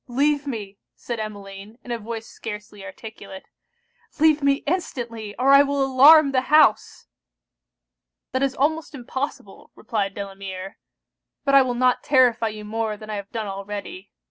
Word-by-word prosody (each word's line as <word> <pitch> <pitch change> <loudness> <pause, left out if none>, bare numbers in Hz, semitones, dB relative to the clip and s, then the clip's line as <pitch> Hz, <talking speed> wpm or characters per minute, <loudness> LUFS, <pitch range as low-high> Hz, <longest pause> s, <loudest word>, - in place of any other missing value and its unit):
leave 285 +3 0
me!' 205 -6 -6 0.2
said 235 -2 -6
Emmeline, 205 0 -8
in 245 - -8
a 235 - -2
voice 225 +1 -6
scarcely 210 -2 -9
articulate. 195 0 -10 0.8
'Leave 310 -1 +4
me 280 0 +1
instantly, 235 - -4
or 260 +3 +3
I 275 0 +8
will 280 -1 +1
alarm 280 +3 +7
the 255 -1 -1
house!' 305 +1 +3 1.3
'That 260 - -1
is 270 -1 0
almost 310 +2 -1
impossible!' 265 +2 -6
replied 200 -3 -3
Delamere; 195 -1 -7 0.7
'but 275 - +1
I 275 - +8
will 250 -2 -1
not 250 0 +2
terrify 250 -4 +3
you 215 -1 -7
more 220 0 -3
than 215 0 -9
I - - -3
have 200 0 -8
done 225 -2 -4
already. 205 - -7
235 Hz, 150 wpm, -23 LUFS, 210-275 Hz, 1.3 s, I